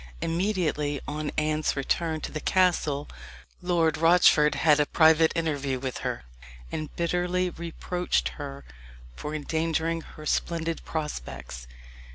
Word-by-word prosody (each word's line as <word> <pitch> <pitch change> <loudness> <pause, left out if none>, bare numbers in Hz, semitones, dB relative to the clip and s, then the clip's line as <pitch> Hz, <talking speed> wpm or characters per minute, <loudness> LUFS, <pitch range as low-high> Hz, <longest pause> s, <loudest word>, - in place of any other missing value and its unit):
Immediately 165 -5 0
on 150 0 -3
Anne's 155 0 +1
return 160 +3 -1
to - - -5
the 155 - -4
castle 160 -6 +1 0.5
Lord 170 -3 +1
Rochford 165 -3 +5
had 150 -2 +4
a 145 - +3
private 160 0 +5
interview 145 -5 -1
with 130 -1 -4
her, - - -3 0.5
and 155 -1 -4
bitterly 180 +1 0
reproached 170 +2 -2
her 140 -2 -8 0.5
for 150 - -5
endangering 160 +2 -1
her 155 -1 -12
splendid 165 +1 -1
prospects. 65 - -5
160 Hz, 120 wpm, -27 LUFS, 150-170 Hz, 0.5 s, Rochford